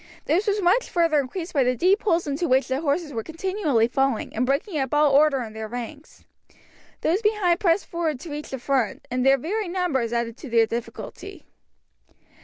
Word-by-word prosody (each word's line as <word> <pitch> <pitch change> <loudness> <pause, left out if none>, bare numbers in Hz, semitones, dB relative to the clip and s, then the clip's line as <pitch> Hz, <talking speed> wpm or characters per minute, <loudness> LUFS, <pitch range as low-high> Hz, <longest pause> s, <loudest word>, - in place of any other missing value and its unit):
This 360 +8 +1
was 410 -1 +1
much 390 +8 +3
further 330 -4 +2
increased 325 +6 -5
by 280 -4 +3
the 250 0 +1
deep 370 - +3
holes 345 -5 +1
into 290 +4 -2
which 260 0 +3
the 260 +2 -1
horses 300 0 -1
were 225 - -2
continually 320 - 0
falling, 270 -1 -1
and 245 +3 0
breaking 300 +5 -1
up 265 +1 -1
all 295 -1 +4
order 280 -2 +4
in 220 -2 -9
their 220 0 -6
ranks. 245 +6 -8 0.8
Those 360 +7 +1
behind 415 -5 +2
pressed 375 -2 +2
forward 325 -5 -2
to 335 - -8
reach 295 +1 -6
the 265 - -4
front, 255 -3 -1
and 250 0 0
their 270 +1 +5
very 395 - -3
numbers 345 -10 -1
added 235 0 -2
to 280 - -9
their 230 -1 +4
difficulty. 230 +1 -7
295 Hz, 195 wpm, -24 LUFS, 250-350 Hz, 0.8 s, their